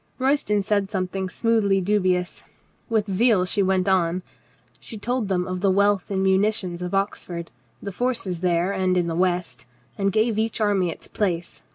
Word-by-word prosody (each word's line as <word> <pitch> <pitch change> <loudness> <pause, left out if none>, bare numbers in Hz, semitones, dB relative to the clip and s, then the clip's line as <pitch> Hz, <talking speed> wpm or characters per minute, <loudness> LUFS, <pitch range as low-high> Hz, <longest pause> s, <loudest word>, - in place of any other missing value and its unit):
Royston 260 -6 +1
said 200 -1 0
something 190 -1 -3
smoothly 215 -3 +2
dubious. 185 -2 0 0.4
With 220 -2 +1
zeal 205 -1 +3
she 200 +2 0
went 190 0 +1
on. 180 -1 +1 0.6
She 225 - -8
told 245 +1 -1
them 180 -2 0
of 185 0 -4
the 195 - +3
wealth 200 +1 +2
and 190 -1 0
munitions 190 -2 +1
of 180 +2 -3
Oxford, 180 -3 -3 0.3
the 200 - -4
forces 200 -5 -2
there 175 +1 +1
and 185 -2 +1
in 175 - +2
the 170 - -2
west, 175 -9 -1 0.3
and 195 0 +1
gave 220 +1 +1
each 225 +1 -1
army 200 -4 +2
its 165 - -8
place. 175 -5 -3
190 Hz, 170 wpm, -23 LUFS, 180-210 Hz, 0.6 s, zeal